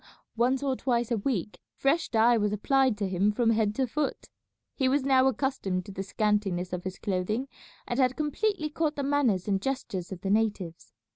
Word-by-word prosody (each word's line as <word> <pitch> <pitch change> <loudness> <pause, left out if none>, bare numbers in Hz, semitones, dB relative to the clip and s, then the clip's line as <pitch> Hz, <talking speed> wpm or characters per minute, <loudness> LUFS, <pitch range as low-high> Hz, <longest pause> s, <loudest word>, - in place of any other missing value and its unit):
Once 250 +4 +1
or 270 -2 +1
twice 240 -2 -1
a 235 - +2
week 210 -4 -2 0.2
fresh 305 +5 +1
dye 230 +1 +4
was 210 -2 +1
applied 260 +3 +2
to 205 -2 -1
him 190 +3 +2
from 230 +1 +2
head 215 -2 +1
to 265 - +1
foot. 290 +4 -3 0.4
He 265 -3 +1
was 275 +1 +2
now 265 -1 +4
accustomed 235 -8 -1
to 205 - -9
the 190 - -5
scantiness 200 -3 -1
of 180 0 -4
his 190 0 -4
clothing, 210 +6 -2 0.4
and 240 - -2
had 255 -1 +3
completely 310 +2 -1
caught 305 -1 -1
the 280 - -2
manners 265 -10 +1
and 195 -2 +1
gestures 225 -8 -3
of 180 -2 -7
the 195 - -1
natives. 205 -6 -1
230 Hz, 195 wpm, -28 LUFS, 200-270 Hz, 0.4 s, dye